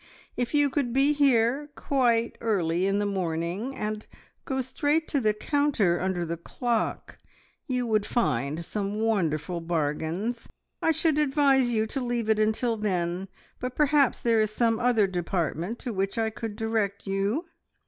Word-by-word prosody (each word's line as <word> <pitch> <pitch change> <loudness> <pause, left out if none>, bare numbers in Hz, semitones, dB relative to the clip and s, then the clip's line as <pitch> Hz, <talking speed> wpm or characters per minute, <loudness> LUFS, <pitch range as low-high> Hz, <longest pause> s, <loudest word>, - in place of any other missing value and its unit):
If 245 +3 -2
you 290 -1 +3
could 260 -5 -1
be 275 +3 +4
here 275 0 +2
quite 235 -4 +1
early 185 -5 +1
in 195 +1 +1
the 205 - 0
morning, 185 +5 -2
and 215 0 -4 0.4
go 265 -1 -1
straight 290 +5 0
to 285 - +1
the 215 -4 +3
counter 225 - +1
under 185 -2 -1
the 170 +1 -3
clock, 235 +7 -2 0.5
you 250 -2 0
would 215 -3 +1
find 155 - 0
some 205 +2 -3
wonderful 175 -6 0
bargains. 165 +8 -2 0.3
I - - +2
should 315 -1 +1
advise 270 -3 +3
you 220 -1 +1
to 265 +5 -3
leave 240 -3 0
it 215 - +2
until 220 +2 +1
then, 185 -3 -1 0.3
but 250 0 -4
perhaps 290 -2 +3
there 230 -2 +3
is 215 - +1
some 225 +1 +1
other 240 -4 +3
department 175 +2 -2
to 240 - -4
which 195 +1 -2
I 225 -1 +1
could 220 -1 -6
direct 220 -3 -1
you." 200 - -1
220 Hz, 160 wpm, -27 LUFS, 190-250 Hz, 0.5 s, be